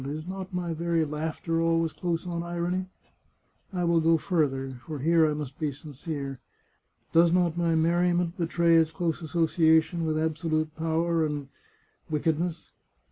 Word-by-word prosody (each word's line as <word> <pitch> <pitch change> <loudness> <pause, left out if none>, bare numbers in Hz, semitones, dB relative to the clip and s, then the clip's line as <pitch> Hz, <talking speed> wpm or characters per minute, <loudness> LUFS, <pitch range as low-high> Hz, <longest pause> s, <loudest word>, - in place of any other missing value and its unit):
Is 150 +3 -5
not 190 +1 -6
my 175 -2 -2
very 165 0 0
laughter 160 +2 -2
always 165 -1 +1
close 170 -1 -2
on 170 -1 -3
irony?... 175 +2 -2 0.8
I 180 -2 -2
will 170 -1 +3
go 165 +1 +4
further 135 -7 0
— - - -24
for 155 -2 -4
here 160 +2 +3
I 150 - -1
must 145 -3 -6
be 150 -2 0
sincere 140 -1 -6 0.4
— - - -42
does 170 0 +6
not 175 -2 +2
my 170 -1 +1
merriment 175 +1 +2
betray 170 -2 +2
its 160 -1 +4
close 165 +1 -2
association 160 0 +2
with 155 0 0
absolute 155 0 -1
power 165 +1 +1
and... 145 -3 -3 0.6
wicked 155 0 0
ness 170 -1 -4
165 Hz, 160 wpm, -27 LUFS, 155-170 Hz, 0.8 s, does